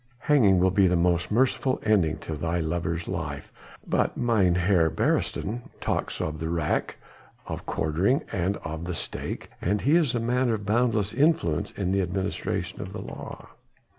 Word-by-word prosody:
Hanging 115 Hz, -11 st, +4 dB
will 95 Hz, +1 st, +3 dB
be 95 Hz, 0 st, +4 dB
the 90 Hz, -, +2 dB
most 85 Hz, 0 st, +2 dB
merciful 130 Hz, +3 st, +1 dB
ending 95 Hz, -8 st, +3 dB
to 80 Hz, -, -4 dB
thy 85 Hz, +3 st, -1 dB
lover's 85 Hz, +1 st, -2 dB
life, -, -, -4 dB, 0.4 s
but -, -, +1 dB
Mynheer 90 Hz, -6 st, +3 dB
Beresteyn 110 Hz, +8 st, -1 dB, 0.2 s
talks -, -, -2 dB
of 75 Hz, 0 st, -3 dB
the 80 Hz, +1 st, -3 dB
rack, 80 Hz, -3 st, -1 dB, 0.5 s
of -, -, -6 dB
quartering 90 Hz, -, +1 dB
and 95 Hz, -1 st, 0 dB
of 80 Hz, +1 st, -5 dB
the 90 Hz, 0 st, -3 dB
stake, -, -, -5 dB
and 100 Hz, +3 st, 0 dB
he 145 Hz, +5 st, +3 dB
is 155 Hz, -8 st, +3 dB
a -, -, +1 dB
man 125 Hz, +2 st, +1 dB
of 110 Hz, -3 st, -1 dB
boundless 110 Hz, -1 st, +1 dB
influence 145 Hz, -, +2 dB
in 95 Hz, -2 st, -2 dB
the 100 Hz, 0 st, +2 dB
administration 95 Hz, +2 st, -3 dB
of -, -, -7 dB
the -, -, -5 dB
law." -, -, -9 dB
95 Hz, 165 wpm, -26 LUFS, 85-115 Hz, 0.5 s, Hanging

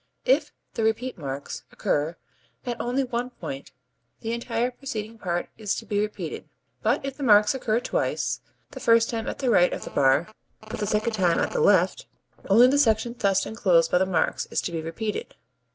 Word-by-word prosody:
If 290 Hz, +3 st, +3 dB, 0.2 s
the 225 Hz, -, -2 dB
repeat 225 Hz, +4 st, 0 dB
marks 140 Hz, -2 st, -6 dB
occur 150 Hz, +3 st, -1 dB, 0.5 s
at 240 Hz, -1 st, -3 dB
only 250 Hz, +3 st, 0 dB
one 245 Hz, -1 st, -3 dB
point 155 Hz, -, -8 dB, 0.5 s
the 225 Hz, +1 st, -3 dB
entire 235 Hz, +1 st, -1 dB
preceding 230 Hz, -4 st, -6 dB
part 175 Hz, -3 st, -2 dB
is 210 Hz, -2 st, -1 dB
to 225 Hz, -, -6 dB
be 205 Hz, -1 st, -1 dB
repeated, 210 Hz, 0 st, -5 dB, 0.3 s
but -, -, +1 dB
if 275 Hz, -1 st, -5 dB
the -, -, -9 dB
marks 210 Hz, -2 st, +6 dB
occur 235 Hz, -4 st, 0 dB
twice 250 Hz, -, -1 dB, 0.3 s
(the -, -, -8 dB
first 230 Hz, 0 st, +4 dB
time 225 Hz, -1 st, -3 dB
at -, -, -3 dB
the 255 Hz, -3 st, 0 dB
right 180 Hz, -4 st, +5 dB
of -, -, -4 dB
the -, -, -8 dB
bar 140 Hz, +8 st, +2 dB, 0.3 s
but -, -, -6 dB
the 205 Hz, -, -1 dB
second 215 Hz, +2 st, 0 dB
time 180 Hz, -5 st, +2 dB
at -, -, 0 dB
the -, -, 0 dB
left), 470 Hz, -, +3 dB, 0.4 s
only 225 Hz, +5 st, +7 dB
the 275 Hz, +3 st, +4 dB
section 235 Hz, -2 st, +2 dB
thus 195 Hz, -2 st, +2 dB
enclosed 180 Hz, -7 st, +2 dB
by 180 Hz, -, +4 dB
the 190 Hz, -, +2 dB
marks 170 Hz, -4 st, 0 dB
is -, -, -1 dB
to -, -, -4 dB
be 165 Hz, -1 st, -3 dB
repeated. 210 Hz, -, -4 dB
220 Hz, 195 wpm, -25 LUFS, 180-245 Hz, 0.5 s, only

